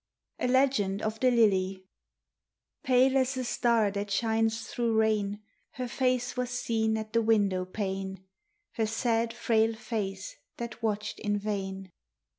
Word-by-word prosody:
A - - 0
LEGEND 250 -7 +2
OF 215 0 -2
THE 255 - +4
LILY 195 -5 +2 1.0
Pale 260 +1 +4
as 260 0 +1
a 255 - -1
star 235 -4 +2
that 200 +1 -3
shines 225 +1 +1
through 230 -2 -1
rain 210 -1 +1 0.3
Her 250 0 -4
face 255 0 0
was 250 -1 -2
seen 225 -3 0
at 220 0 -6
the 230 - +3
window 205 -5 +2
pane, 190 -1 -4 0.5
Her 220 -1 -1
sad, 230 +1 0
frail 225 -1 +1
face 210 -4 -4 0.2
that 235 -1 -6
watched 210 -1 -2
in 205 -1 0
vain. 195 -2 -4
220 Hz, 140 wpm, -29 LUFS, 200-235 Hz, 1.0 s, THE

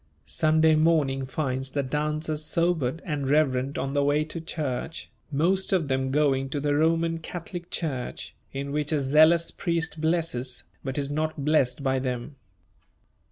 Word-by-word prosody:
] - - -39
Sunday 155 0 +3
morning 155 -4 +2
finds 135 -1 -2
the 140 - 0
dancers 150 +2 -2
sobered 165 -3 0
and 145 -6 -2
reverent 140 -2 +2
on 135 +1 -2
the 145 -1 +2
way 145 +2 +2
to 160 +2 -6
church, 155 -1 -4 0.2
most 180 +7 +1
of 170 -7 +1
them 130 0 0
going 135 -1 +2
to 145 - -2
the 145 0 0
Roman 165 +2 +2
Catholic 175 +1 -7
church, 135 -7 -4 0.2
in 140 +1 -4
which 150 +1 -1
a 155 - +2
zealous 155 +5 +4
priest 165 -3 -1
blesses, 160 -7 -1 0.2
but 135 0 -4
is 140 0 -1
not 155 -1 -2
blessed 140 -3 +2
by 135 -1 +1
them. 125 +2 -4
150 Hz, 160 wpm, -26 LUFS, 135-160 Hz, 0.2 s, zealous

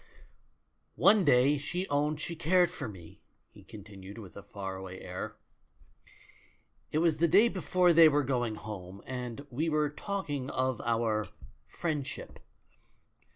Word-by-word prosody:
"One 200 +2 +6
day 140 0 +4
she 180 +6 -3
owned 150 +1 0
she 170 +3 -4
cared 175 +2 +3
for - - -5
me," 90 -5 -13 0.3
he - - -16
continued, 100 -2 -11
with 100 -6 -11
a 100 - -8
far 95 -1 -6
away 95 0 -8
air. 90 0 -6 1.6
"It - - 0
was 160 -1 +2
the 170 +2 +3
day 200 +8 +5
before 180 -2 +2
they 165 -1 +8
were 145 -1 +2
going 120 -4 -1
home, 100 -3 -8
and 125 +1 -5
we 155 +7 -1
were 150 -1 +1
talk 200 +6 -4
ing 140 -3 -3
of 130 -1 -1
our 115 -3 0 0.4
'friendship.' 155 -5 -4
140 Hz, 145 wpm, -30 LUFS, 110-160 Hz, 1.6 s, they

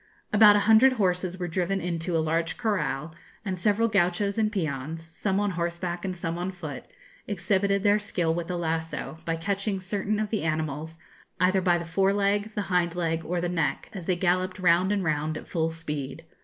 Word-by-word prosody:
About 210 -1 +8
a 205 - +3
hundred 225 +4 +7
horses 185 -4 0
were 180 -1 -3
driven 185 +3 -1
into 170 -1 -1
a 160 - +1
large 165 +1 0
corral, 165 - -1 0.3
and 185 -2 -3
several 210 +5 +2
gauchos 200 +1 +1
and 215 -1 +2
peons, 160 -4 -3
some 190 +4 -2
on 205 -1 +1
horseback 170 0 -3
and 185 -1 -3
some 170 0 -3
on 180 +2 -2
foot, 175 -6 -7 0.4
exhibited 200 0 +1
their 205 0 +4
skill 175 -6 -1
with 170 0 -3
the 180 - -2
lasso, 160 -1 -3
by 165 - 0
catching 195 +3 -1
certain 205 +2 -2
of 215 -1 -2
the 215 - 0
animals, 155 0 -2 0.4
either 185 +1 +3
by 175 -1 +3
the 170 - -5
fore 195 +4 +2
leg, 205 +1 0
the 210 - -1
hind 175 -1 +2
leg, 165 -2 -1
or 175 +2 -2
the 175 - -1
neck, 160 -6 -1
as 180 -5 -7
they 185 - +2
galloped 185 +1 0
round 180 +1 +3
and 200 -2 +1
round 155 -1 -1
at - - -10
full 165 -1 0
speed. 155 -2 -5
180 Hz, 195 wpm, -27 LUFS, 165-200 Hz, 0.4 s, About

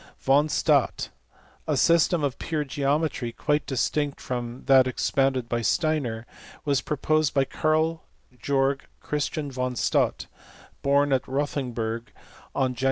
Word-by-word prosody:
Von 140 +3 +3
Staudt. - - +1 0.6
A - - +1
system 170 -1 +3
of 140 -2 -1
pure 155 -2 -2
geometry, 140 -2 -1
quite 150 +5 -1
distinct 145 +2 -1
from 120 0 -5
that 130 -1 +6
expounded 130 -1 0
by 120 0 -1
Steiner, 120 - 0 0.4
was 140 -2 +2
proposed 155 0 0
by 135 -1 +3
Karl 155 +3 0 0.4
Georg 135 +2 0
Christian 150 0 -3
von 125 -1 -2
Staudt, - - +1 0.6
born 140 0 +3
at 130 - 0
Rothenburg 125 -5 -2 0.4
on 130 -2 +1
Jan. 125 - -12
140 Hz, 125 wpm, -26 LUFS, 125-150 Hz, 0.6 s, that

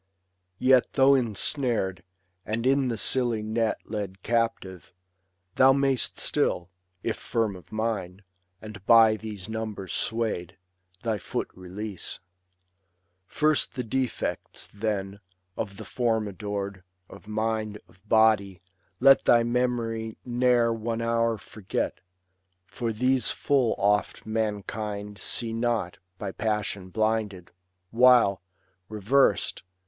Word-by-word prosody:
Yet 130 +1 +4
though 135 +1 +5
insnar'd, 115 - 0 0.4
and 115 +3 -2
in 135 0 +3
the 115 -2 -2
silly 120 -1 +1
net 110 +1 -1
Led 100 -3 -5
captive, 115 -7 -1 0.7
thou 135 0 +7
may'st 135 -2 +1
still, 90 +1 0 0.3
if 115 - -1
firm 110 -4 -1
of 90 - -14
mind, 105 -4 -3 0.4
And 105 -3 -9
by 115 -2 +7
these 105 -4 -7
numbers 110 -3 -5
sway'd, 110 -6 -2 0.5
thy 110 -3 -1
foot 90 - -4
release* 95 +2 -6 1.1
First 155 -4 +1
the 125 - -2
defects, 130 +1 -3
then, 100 -2 -3 0.4
of 100 -2 -5
the - - -8
form 115 -3 0
adored, 100 -1 -5 0.3
Of - - -14
mind, 110 -1 -2
of 95 - -24
body, 110 -4 +3 0.4
let 135 +1 +6
thy 120 -1 +5
memory 115 -2 -1
ne'er 120 -1 +3
One 115 +1 -3
hour 115 -1 +1
forget; 105 -1 -4 0.7
for 115 +5 -3
these 125 +2 +1
full 135 -5 +1
oft 105 +1 +1
mankind 105 -1 -3
See 115 -2 -1
not, 115 -6 -1 0.2
by 100 -2 -4
passion 100 -3 -2
blinded; 110 -3 -1 0.4
while, 120 -6 +5 0.5
reversed. 110 +6 +2
110 Hz, 110 wpm, -27 LUFS, 100-120 Hz, 1.1 s, thou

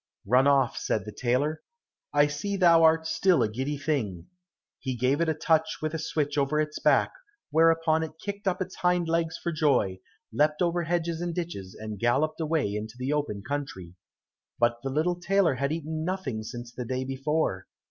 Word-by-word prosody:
"Run 130 +3 +4
off," 135 -3 +3
said 105 -3 -1
the 105 - -6
tailor, 130 +7 0 0.5
"I 145 0 +5
see 150 +8 -3
thou 170 -3 +6
art 160 0 +4
still 180 +2 +3
a - - +2
giddy 130 +7 -3
thing." 115 - -2 0.5
He 130 -1 -3
gave 130 +6 +1
it 170 - +2
a 160 - 0
touch 160 +1 +1
with 155 0 -3
a 160 - -2
switch 150 -1 -1
over 140 +2 +1
its 150 0 -2
back, - - +3 0.4
whereupon 165 0 +3
it 160 - -4
kicked 200 +1 -6
up 185 0 +1
its - - -12
hind 180 -1 +1
legs 165 0 0
for 170 - -3
joy, 140 - +1 0.3
leapt 150 +1 +2
over 175 0 0
hedges 170 0 -1
and 175 -1 -3
ditches, 160 - -5
and 110 -2 -6
galloped 135 +8 +1
away 155 -9 0
into 110 +2 -5
the 130 +3 -1
open 145 -10 -2
country. 135 -12 -5 0.6
But 120 0 +2
the 135 - -3
little 165 +6 0
tailor 190 -3 +2
had 140 +2 -1
eaten 160 0 -3
nothing 165 -11 -3
since 120 +2 -8
the 125 - -5
day 130 +2 -2
before. 135 -6 -1
150 Hz, 190 wpm, -27 LUFS, 125-165 Hz, 0.6 s, thou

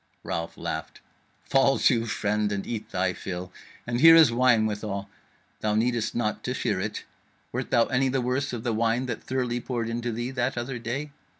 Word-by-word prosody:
Ralph 85 0 -4
laughed: - - -5 0.4
"Fall 135 0 +3
to, 115 -2 +3
friend, 105 -1 0
and 100 -1 -2
eat 115 -2 -5
thy 95 0 0
fill; 90 0 -6 0.3
and 120 0 -1
here 165 +1 +10
is 160 -7 +7
wine 120 -2 +4
withal. 100 -2 -3 0.5
Thou 105 -1 0
needest 115 0 0
not 110 -3 -1
to - - -1
fear - - -1
it. - - -3 0.5
Wert - - -3
thou 120 -1 +4
any 130 +1 +1
the 135 +1 0
worse 130 +3 -1
of 120 -2 -5
the 120 -2 0
wine 115 +3 +1
that 120 -3 -4
Thirly 125 -2 -1
poured 120 -2 -3
into 120 +1 -2
thee 120 +3 -3
that 130 -1 -1
other 120 +1 -3
day?" 130 +6 -4
120 Hz, 190 wpm, -26 LUFS, 110-125 Hz, 0.5 s, here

